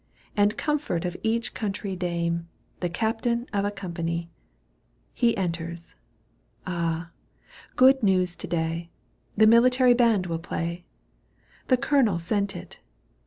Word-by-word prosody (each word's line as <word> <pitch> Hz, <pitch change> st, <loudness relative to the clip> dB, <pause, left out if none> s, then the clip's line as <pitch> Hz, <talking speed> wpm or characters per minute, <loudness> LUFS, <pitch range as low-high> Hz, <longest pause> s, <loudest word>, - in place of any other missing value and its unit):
And 205 Hz, 0 st, +2 dB
comfort 295 Hz, -, -1 dB
of 175 Hz, 0 st, -3 dB
each 225 Hz, +1 st, -1 dB
country 200 Hz, -2 st, -3 dB
dame. 170 Hz, -1 st, -2 dB, 0.3 s
The 175 Hz, -, -1 dB
captain 230 Hz, +5 st, -1 dB
of 200 Hz, -1 st, +1 dB
a -, -, +1 dB
company. 170 Hz, -4 st, -4 dB, 0.8 s
He 235 Hz, -2 st, +2 dB
enters. 170 Hz, -2 st, -4 dB, 0.7 s
Ah! 170 Hz, -1 st, -2 dB, 0.6 s
good 265 Hz, +1 st, +6 dB
news 185 Hz, -4 st, +2 dB
to -, -, -6 dB
day! 165 Hz, 0 st, -2 dB, 0.5 s
The 220 Hz, -, +6 dB
military 250 Hz, +3 st, +6 dB
band 230 Hz, -6 st, +3 dB
will 165 Hz, -2 st, -3 dB
play. 170 Hz, +1 st, -4 dB, 0.8 s
The 255 Hz, -, +4 dB
colonel 270 Hz, -, +2 dB
sent 200 Hz, +3 st, -1 dB
it. -, -, -10 dB
190 Hz, 120 wpm, -26 LUFS, 170-230 Hz, 0.8 s, good